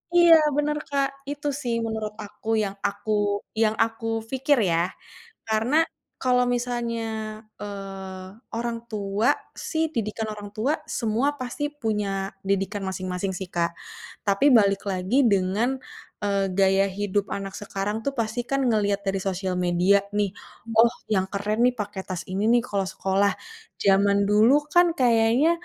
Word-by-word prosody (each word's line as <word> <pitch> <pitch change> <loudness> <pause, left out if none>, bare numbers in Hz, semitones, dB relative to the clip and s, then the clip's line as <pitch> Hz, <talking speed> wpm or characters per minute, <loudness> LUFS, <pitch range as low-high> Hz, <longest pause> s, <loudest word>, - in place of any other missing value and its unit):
Iya, 345 -1 +8 0.2
benar, 300 0 +1
Kak. 280 -1 +2 0.2
Itu, 290 +1 -4
sih, 240 -3 -1
menurut 220 -1 -3
aku, 205 +1 -13 0.2
yang 195 -1 -3
aku 205 +2 -5 0.5
yang 215 0 +2
aku 225 0 -4 0.2
fikir, 270 +2 +2
ya, 170 +3 +1 0.6
karena 220 +5 +1 0.5
kalau 250 -1 +3
misalnya, 240 -1 -2 0.6
eee, 195 -2 -7 0.3
orang 235 0 -2
tua, 205 +1 0 0.4
sih, 320 0 +1
didikan 220 -3 -2
orang 205 -1 -7
tua, 255 +8 +1 0.3
semua 230 +3 +1
pasti 255 +3 -4 0.2
punya 210 -3 0 0.4
didikan 195 +1 0
masing-masing, 185 0 -3
sih, 190 -2 -6
Kak. 170 -1 0 0.5
Tapi, 200 +9 +4
balik 200 -2 +2
lagi 190 +9 +1
dengan, 215 +4 +2 0.4
eee, 200 -1 0
gaya 195 0 +4
hidup 205 -1 0
anak 195 -1 -4
sekarang, 205 +2 -3
tuh, 280 - 0
pasti 225 +1 -1
kan 275 - +2
ngeliat 205 -3 +1
dari 195 -1 0
sosial 190 -1 -2
media, 180 +2 +3 0.2
nih, 205 -2 0 0.4
"Oh, 230 +1 +6 0.2
yang 190 -1 0
keren, 210 +3 -1
nih, 250 0 +4
pake 205 -2 -4
tas 185 -2 -6
ini, 190 +2 -2
nih, 240 0 +4
kalau 200 -4 -1
sekolah." 195 +2 +2 0.5
Zaman 200 +1 +4
dulu, 230 +9 +4
kan, 350 +4 +5
kayaknya, 240 +4 +4
210 Hz, 145 wpm, -25 LUFS, 195-235 Hz, 0.6 s, Iya